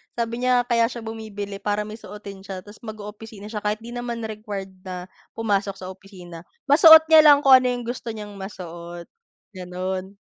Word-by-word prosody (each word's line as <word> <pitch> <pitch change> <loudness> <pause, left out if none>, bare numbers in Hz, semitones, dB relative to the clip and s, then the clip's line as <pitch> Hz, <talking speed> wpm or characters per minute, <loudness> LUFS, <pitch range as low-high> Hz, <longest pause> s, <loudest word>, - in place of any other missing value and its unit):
Sabi 235 +1 -3
niya, 250 -1 +3
kaya 235 -1 +2
siya 235 -1 -8
bumibili 205 -3 -7
para 205 +1 -1
may 215 +2 -9
suotin 200 -2 -10
siya, 190 -2 -7
tapos 205 +1 -15
mag-oopisina 210 -1 -9
siya, 210 -2 -5
kahit 210 +1 -1
di 235 - -9
naman 240 -1 -5
required 210 -3 -6
na 180 -1 -7 0.3
pumasok 200 -3 -1
sa 185 -1 -8
opisina. 180 -3 -12 0.2
Masuot 320 +2 +9
niya 315 -1 +9
lang 290 -1 +8
kung 270 - +5
ano 255 0 +4
yung 245 -1 -2
gusto 240 -1 -5
niyang 210 -2 -9
masuot, 175 -3 -9 0.5
ganon. 185 +2 -5
210 Hz, 175 wpm, -23 LUFS, 190-230 Hz, 0.5 s, Masuot